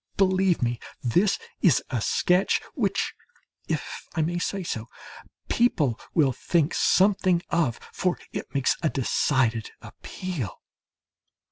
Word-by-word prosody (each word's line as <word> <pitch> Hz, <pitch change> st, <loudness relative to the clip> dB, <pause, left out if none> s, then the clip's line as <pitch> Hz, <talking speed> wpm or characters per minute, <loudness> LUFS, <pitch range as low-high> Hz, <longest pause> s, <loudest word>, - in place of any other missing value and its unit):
Believe 190 Hz, -4 st, +3 dB
me, 120 Hz, -1 st, 0 dB, 0.2 s
this 180 Hz, -, +3 dB, 0.2 s
is 165 Hz, -10 st, +4 dB
a 120 Hz, -4 st, -1 dB
sketch 180 Hz, -, +2 dB
which, -, -, 0 dB, 0.5 s
if -, -, -4 dB
I 160 Hz, -, +2 dB
may 175 Hz, +2 st, -1 dB
say 195 Hz, +2 st, -2 dB
so, 115 Hz, -8 st, -4 dB, 0.6 s
people 155 Hz, -, +2 dB, 0.2 s
will 145 Hz, -5 st, +4 dB
think 165 Hz, +2 st, +1 dB
something 185 Hz, -3 st, +3 dB
of, 160 Hz, -9 st, +1 dB
for 180 Hz, -1 st, 0 dB, 0.2 s
it -, -, -5 dB
makes 140 Hz, -2 st, +2 dB
a 160 Hz, -, +2 dB
decided 125 Hz, -4 st, +1 dB
appeal. 165 Hz, -, -6 dB
165 Hz, 120 wpm, -26 LUFS, 125-185 Hz, 0.6 s, is